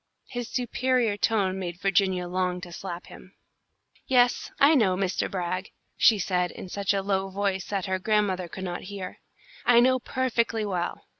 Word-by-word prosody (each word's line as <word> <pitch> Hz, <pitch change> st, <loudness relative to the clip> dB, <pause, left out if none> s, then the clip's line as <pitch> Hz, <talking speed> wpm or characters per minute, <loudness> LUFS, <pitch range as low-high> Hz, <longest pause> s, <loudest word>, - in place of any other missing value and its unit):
His 245 Hz, -2 st, -5 dB
superior 250 Hz, -2 st, +1 dB
tone 200 Hz, -3 st, +1 dB
made 175 Hz, -2 st, -5 dB
Virginia 190 Hz, -2 st, +1 dB
long 180 Hz, 0 st, -1 dB
to 180 Hz, -, -8 dB
slap 175 Hz, 0 st, -6 dB
him. 185 Hz, -, -14 dB, 0.7 s
"Yes, 245 Hz, -2 st, +3 dB
I 285 Hz, +3 st, +7 dB
know, 215 Hz, -10 st, +3 dB
Mr. 190 Hz, -1 st, -1 dB
Brag," 185 Hz, 0 st, -3 dB, 0.3 s
she 225 Hz, -, +5 dB
said, 180 Hz, -2 st, 0 dB
in 185 Hz, -, -9 dB
such 200 Hz, +1 st, -1 dB
a 195 Hz, -1 st, 0 dB
low 195 Hz, -1 st, 0 dB
voice 195 Hz, -1 st, -1 dB
that 195 Hz, -3 st, -2 dB
her 190 Hz, 0 st, -1 dB
grandmother 195 Hz, -3 st, +1 dB
could 190 Hz, +2 st, -8 dB
not 175 Hz, -1 st, -4 dB
hear. 195 Hz, -2 st, -7 dB, 0.4 s
"I 240 Hz, -1 st, +6 dB
know 255 Hz, +1 st, +4 dB
perfectly 235 Hz, -3 st, 0 dB
well. 180 Hz, -3 st, -3 dB
195 Hz, 165 wpm, -26 LUFS, 185-225 Hz, 0.7 s, I